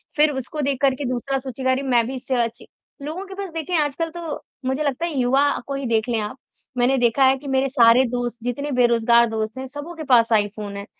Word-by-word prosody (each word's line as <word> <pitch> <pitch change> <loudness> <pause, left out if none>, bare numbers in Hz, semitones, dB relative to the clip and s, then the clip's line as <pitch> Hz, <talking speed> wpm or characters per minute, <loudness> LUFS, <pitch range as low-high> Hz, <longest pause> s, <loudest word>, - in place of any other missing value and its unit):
फ़िर 300 0 +4
उसको 265 +3 -4
देख 275 0 -1
कर 270 -1 +3
के 280 - -5
दूसरा 270 +2 -2
सूचना 260 0 -2
अरे 260 +1 0
मैं 240 -3 +2
भी 265 - -5
इससे 255 +1 -3
अचि 230 0 -6 0.3
लोगों 325 +7 -5
के 385 - -10
पास 395 -2 -5
देखिए 330 +2 -3
आजकल 295 +3 -2
तो 330 -3 -6 0.2
मुझे 265 +4 0
लगता 285 +4 -1
है 335 - -3
युवा 260 +3 +3 0.2
को 280 - -3
ही 275 -1 -4
देख 225 0 +1
लें 230 -2 +1
आप। 210 +5 -5 0.4
मैंने 255 +2 +3
देखा 245 +2 +3
है 265 +1 +4
कि 280 +1 -11
मेरे 265 0 +1
सारे 240 -1 +5
दोस्त 245 -1 -3
जितने 280 +4 -3
बेरोज़गार 235 -1 +4
दोस्त 220 +2 -3
हैं 265 - -5
सबके 305 +4 -8
पास 235 -3 +4
आईफ़ोन 205 -1 -1
है। 200 - -6
260 Hz, 230 wpm, -22 LUFS, 235-285 Hz, 0.4 s, सारे